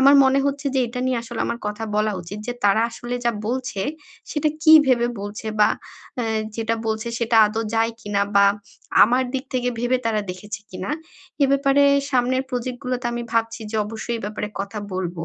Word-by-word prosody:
আমার 275 +2 +7
মনে 265 +1 +4
হচ্ছে 280 +1 -2
যে, 265 - +3
এটা 250 +2 -5
নিয়ে 255 -2 +1
আসলে 235 - -6
আমার 235 - -2
কথা 210 +2 -3
বলা 215 0 +2
উচিত 175 +4 -8
যে 245 - -1
তারা 205 +2 +5
আসলে 240 +1 -5
যা 235 - +4 0.2
বলছে, 250 -4 -2 0.5
সেটা 305 0 +1
কি 315 -1 +7
ভেবে 240 -2 +3
বলছে? 205 +2 -6
বা - - +7 0.5
এ - - -1 0.3
যেটা 225 0 0
বলছে 220 +1 -2
সেটা 235 -1 +1
আদৌ 220 +2 -2
যায় 225 +1 +2
কিনা? 205 -1 0
বা 200 - +7 0.6
আমার 245 +4 +4
দিক 265 0 -2
থেকে 250 0 +1
ভেবে 245 +1 +2
তারা 215 -2 +1
দেখেছে 205 +3 -7
কিনা? 185 +1 -5 0.5
এ - - +7
ব্যাপারে 275 0 +4 0.3
সামনের 255 0 +2
প্রজেক্ট 250 0 -3
গুলোতে 250 -1 -2
আমি 240 0 -3
ভাবছি 230 0 0
যে 220 - -2
অবশ্যই 225 +2 -4
এ - - -11
ব্যাপারে 210 0 -4
কথা 200 +2 -5
বলবো। 175 -2 -3
230 Hz, 195 wpm, -22 LUFS, 210-255 Hz, 0.6 s, আমার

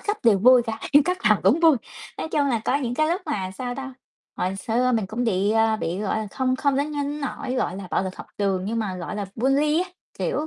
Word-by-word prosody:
cấp 415 0 -2
đều 220 -4 +5
vui 250 +4 +6
cả, 225 -1 -5
như 290 +1 +7
cấp 360 +2 0
nào - - +4
cũng 330 - +4
vui, 325 -4 +6 0.4
nói - - -3
chung 295 -2 +1
là 235 -4 0
có 270 - +2
những 250 -4 -2
cái 310 +4 +2
lúc 350 +4 0
mà, 185 -2 -2
sao 245 +6 -5
ta, 265 0 -7 0.4
hồi 185 +1 -1
xưa 235 +6 0
mình 220 -4 +1
cũng 225 +5 -3
bị, 200 -2 +1
à, 225 0 +3
bị, 175 -3 -3
gọi 210 +1 -1
là, 215 - -3
không 255 +2 0
không 280 0 +1
đến 285 +2 0
nhưng 290 0 -3
nỗi, 270 -2 -4
gọi 245 -8 -1
là, 195 -2 -7
bạo - - +1
lực 185 0 -5
học - - -9
trường 195 -2 0
nhưng 225 +3 -2
mà, 200 -5 -2
gọi 180 +3 -5
là, 205 -1 -3
bully 285 +6 +2
á, 370 - -9 0.3
kiểu, 300 - -1
245 Hz, 265 wpm, -24 LUFS, 205-285 Hz, 0.4 s, như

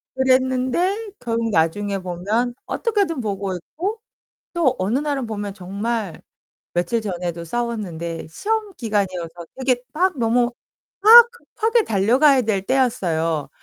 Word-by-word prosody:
그랬는데 260 - +1
결국 230 -1 -1
나중에 195 +4 +1
보면 200 +7 -1
어떻게든 400 - 0
보고 195 -3 -3
있고 375 - -5 0.5
또 315 -7 +2
어느 200 +7 +1
날은 285 -4 -2
보면 205 -2 -4
정말 200 +1 -4 0.6
며칠 175 +7 0
전에도 175 -4 -4
싸웠는데 175 -6 -4
시험 425 - -2
기간이어서 185 -6 -3
되게 255 -2 0
막 360 -1 +1
너무 240 +1 +2 0.5
막 465 +3 +9
급하게 460 -1 0
달려가야 255 - +4
될 210 -3 0
때였어요. 170 - 0
230 Hz, 275 characters per minute, -21 LUFS, 190-275 Hz, 0.6 s, 막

